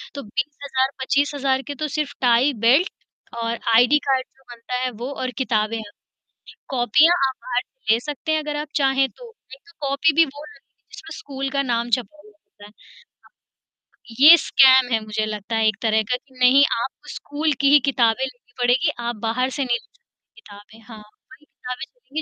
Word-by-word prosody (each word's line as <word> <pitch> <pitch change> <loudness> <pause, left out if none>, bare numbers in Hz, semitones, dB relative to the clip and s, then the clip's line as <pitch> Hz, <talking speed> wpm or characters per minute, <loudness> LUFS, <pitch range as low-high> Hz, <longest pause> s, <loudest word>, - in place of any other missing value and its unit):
तो 280 - -6
20,000 265 +3 -2
25,000 275 -1 0
के 285 - -4
तो - - 0
सिर्फ़ 285 -2 -2
टाइ, 250 +3 +3
बेल्ट, 280 +10 +4 0.5
और 230 0 -2 0.2
आईडी 245 +6 +5
कार्ड, 260 -1 +1
जो 270 - -27
बनता 235 +1 -10
है, 255 - 0
वो, 240 +5 -7
और 255 -2 -4
किताबें 225 -3 -1
हैं। 210 -2 -9 0.8
कॉपीयाँ 285 +7 +4
आप 260 - -5
बाहर 250 0 -2 0.3
ले 225 - +3
सकते 300 +3 -4
हैं, 315 - +2
अगर 295 0 -4
आप 300 0 -5
चाहें 270 -1 +2
तो। 470 -2 -15 0.2
एक 270 - -22
तो - - -17 0.2
कॉपी 285 +3 +2
भी 330 - +6
वो 290 +1 -11
लगेंगी, 280 -2 -19
जिसमें 330 -5 -10
स्कूल 275 -1 -5
का 275 0 0
नाम 240 -2 -2
छपा 205 -4 -10
हुआ 210 - -17
होता 205 0 -17
है। - - -16 1.5
ये 315 +4 +10
स्कैम 260 -4 +5
है, 225 - +2
मुझे 215 0 -2
लगता 215 +1 -5
है, 220 -1 +2
एक 215 - +1
तरह 220 -1 +2
का, - - +3
कि 260 -1 -23
"नहीं, 260 +3 +6 0.2
आपको 265 - -7
स्कूल 300 +1 -2
की 280 - +4
ही 295 - +8
किताबें 240 -1 +1
लेनी 245 -1 -14
पड़ेंगी, 255 +6 +2
आप 235 0 -3
बाहर 255 +3 0
से - - +1
नहीं 240 -1 0
ले - - -19
सकते - - -27
किताबें।" 205 +2 -16
हाँ। 220 -3 -11
वही 290 +8 -20
किताबें 250 -3 -8
चलेंगी, 315 - -8
260 Hz, 190 wpm, -21 LUFS, 235-285 Hz, 1.5 s, ये